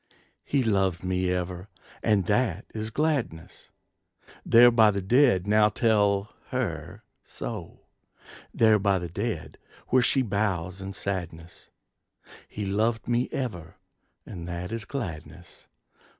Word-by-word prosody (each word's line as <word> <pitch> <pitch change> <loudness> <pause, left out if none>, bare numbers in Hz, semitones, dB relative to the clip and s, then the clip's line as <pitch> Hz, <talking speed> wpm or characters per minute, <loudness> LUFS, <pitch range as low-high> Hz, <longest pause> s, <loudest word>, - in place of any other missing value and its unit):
He 140 -2 0
loved 95 -6 +1
me 90 0 0
ever, 90 +1 -4 0.3
and 105 -4 +2
that 105 -1 0
is 110 0 -4
gladness! 135 - -2 0.7
There 120 +1 +7
by 110 -2 +5
the 100 -1 -1
dead 120 -3 +4
now 105 +1 +4
tell 105 -2 +1
her - - -4 0.2
so; - - -7 0.7
There 110 -2 +4
by 100 -1 +2
the 90 -1 -5
dead 95 -2 -4 0.3
where 130 - +4
she 130 +2 +2
bows 95 -4 -2
in 95 0 -6
sadness. 85 -4 -6 0.8
He 105 - -5
loved 110 +4 0
me 120 +1 0
ever, 90 -11 -5 0.5
and 85 -4 -8
that 90 +2 -5
is 115 -2 -4
gladness! 85 - -7
100 Hz, 120 wpm, -26 LUFS, 90-115 Hz, 0.8 s, There